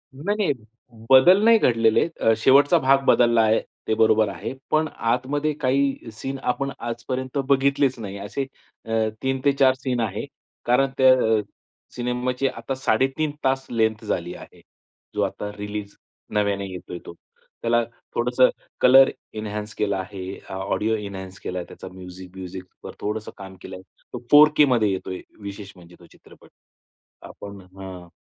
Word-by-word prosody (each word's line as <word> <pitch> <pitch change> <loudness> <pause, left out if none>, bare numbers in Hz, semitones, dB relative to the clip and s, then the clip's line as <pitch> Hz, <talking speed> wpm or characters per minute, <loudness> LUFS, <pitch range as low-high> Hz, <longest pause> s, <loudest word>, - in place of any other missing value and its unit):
नाही 190 +10 -2
नाही, 195 -9 +1 0.6
बदल 175 +10 +7
नाही 230 0 +7
घडलेले 115 - +3
आहेत. 165 - -2
अ, 115 - +4
शेवटचा 140 +7 +5
भाग 135 -1 +3
बदलला 120 -1 +4
आहे. 110 0 +3 0.3
ते 110 - +1
बरोबर 110 -1 +4
आहे, 100 +6 -6 0.2
पण 155 0 +3
आतमध्ये 135 +5 -1
काही 135 -2 0
सीन 135 +5 -5
आपण 135 +2 -3
आजपर्यंत 130 +3 -4
बघितलेच 140 -1 +2
नाही 100 -2 -6
असे 105 +7 -4 0.4
अ, 115 - -7 0.3
3 130 0 0
ते 140 - +6
4 135 -1 +4
सीन 130 -2 -2
आहे 105 0 -2 0.4
कारण 135 +3 +3
त्या 130 -1 +7 0.3
अ, - - -1 0.5
सिनेमाची 125 +2 -1
आता 135 0 -4
3:30 135 +4 0
तास 135 0 +1
लेंग्थ 110 -2 0
झाली 85 0 -2
आहे. - - -14 0.5
जो - - 0
आता 105 - -4
रिलीज, 105 0 -6 0.4
नव्याने 100 -1 0
येतोय 90 -1 -7
तो. - - -9 0.5
त्याला 120 0 +2 0.3
थोडंसं 125 +2 +3 0.3
कलर 135 +1 +7 0.2
एन्हान्स 105 0 -5
केला 100 -2 0
आहे, 95 0 -6 0.3
ऑडिओ 105 +3 -1
एन्हान्स 95 -2 -7
केला 90 0 -4
आहे 85 - -6
त्याचा, - - -10
म्युझिक 90 0 -11
ब्यूझिकवर 95 -1 -9
थोडंसं 105 +1 -3
काम 95 -1 -10
केलंय. 95 0 -9 0.3
तो - - -4
4 150 +1 +9
केमध्ये 120 -8 +4
येतोय, 95 -1 -4 0.2
विशेष 100 0 -8
म्हणजे 90 -1 -16
तो 85 - -16
चित्रपट. - - -19 0.8
आपण 100 -1 -10
हं, 95 -1 -10
115 Hz, 150 wpm, -23 LUFS, 100-135 Hz, 0.8 s, 4